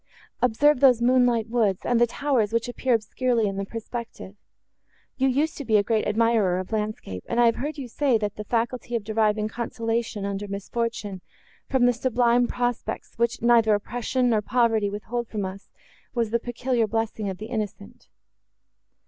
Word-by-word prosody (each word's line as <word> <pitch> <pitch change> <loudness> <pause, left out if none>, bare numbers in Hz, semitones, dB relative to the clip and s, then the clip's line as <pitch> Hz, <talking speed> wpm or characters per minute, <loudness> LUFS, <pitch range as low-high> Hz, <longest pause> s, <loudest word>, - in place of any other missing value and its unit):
Observe 255 +4 +3
those 255 -3 +6
moonlight 245 -2 +3
woods, 225 -5 0
and 240 -1 +2
the 240 - +5
towers, 245 -4 0
which 230 +1 0
appear 245 0 +1
obscurely 230 +1 0
in 195 -1 -3
the 195 - -2
perspective. 230 -2 -7 0.8
You 265 0 +2
used 290 +5 0
to - - -3
be 220 -4 +3
a 205 - +3
great 220 +1 0
admirer 215 -4 +2
of 185 +2 -5
landscape, 210 - -3
and 235 - 0
I 240 - +6
have 230 - +3
heard 300 +4 -4
you 270 -3 -5
say, 260 0 +1
that 210 -2 -3
the 210 - -6
faculty 240 +2 -2
of 230 - -1
deriving 215 0 +1
consolation, 230 -1 -3
under 200 +1 -3
misfortune, 200 -1 -4 0.5
from 260 -2 +3
the 245 - +4
sublime 240 0 +2
prospects, 245 -1 -3
which 235 0 0
neither 230 -3 +5
oppression, 245 +4 -1
nor 215 -2 +2
poverty 225 -2 +2
withhold 220 +4 -4
from 210 -3 -3
us, 190 +1 -8 0.5
was 230 -3 0
the 235 - +2
peculiar 240 -1 -1
blessing 220 -1 -2
of 190 - -5
the 215 - -7
innocent." 210 -3 -5
230 Hz, 175 wpm, -25 LUFS, 210-245 Hz, 0.8 s, those